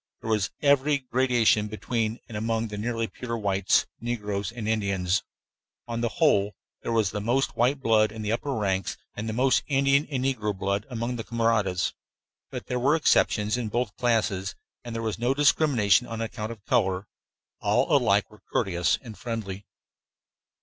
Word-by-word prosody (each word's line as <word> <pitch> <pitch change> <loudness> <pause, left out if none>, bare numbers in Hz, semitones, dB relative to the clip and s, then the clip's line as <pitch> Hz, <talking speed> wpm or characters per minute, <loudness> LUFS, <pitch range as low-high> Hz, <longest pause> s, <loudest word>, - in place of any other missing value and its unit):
There 115 - -3
was 105 -3 +1
every 140 +1 +4
gradation 125 -5 +2
between 110 +1 -2
and 115 - -9
among 115 +1 -1
the 105 - -6
nearly 115 +1 -1
pure 115 +1 -5
whites, 100 -3 +2
negroes, 105 -4 -3
and 115 -2 -6
Indians. 100 -4 +1 0.7
On 115 -1 -3
the 120 - +1
whole, 105 -11 +3 0.3
there - - -3
was 110 -4 +2
the 105 - -3
most 125 +6 0
white 125 +5 +2
blood 110 -3 +3
in 110 0 -7
the 105 - -1
upper 125 +5 -1
ranks, 95 -4 -1 0.2
and 110 +2 -3
most 130 +2 +3
Indian 140 +1 +3
and 130 -3 -1
negro 105 -7 -1
blood 100 +3 -1
among 120 0 -3
the 115 - -4
camaradas; 110 -6 +1 0.6
but - - -6
there 125 - -2
were 140 +5 +3
exceptions 110 -8 +2
in 120 -3 -2
both 120 -1 -2
classes, 105 -5 0 0.3
and 120 -1 -6
there 115 - -3
was 110 -1 -2
no 125 +3 +1
discrimination 130 -7 +3
on 115 -1 -5
account 115 -1 -4
of 110 -4 -11
color. 95 -7 +1 0.5
All - - +2
alike - - +3
were - - -17
courteous 85 -2 +1
and 115 -4 -9
friendly. 105 -5 -5
115 Hz, 170 wpm, -26 LUFS, 105-125 Hz, 0.7 s, every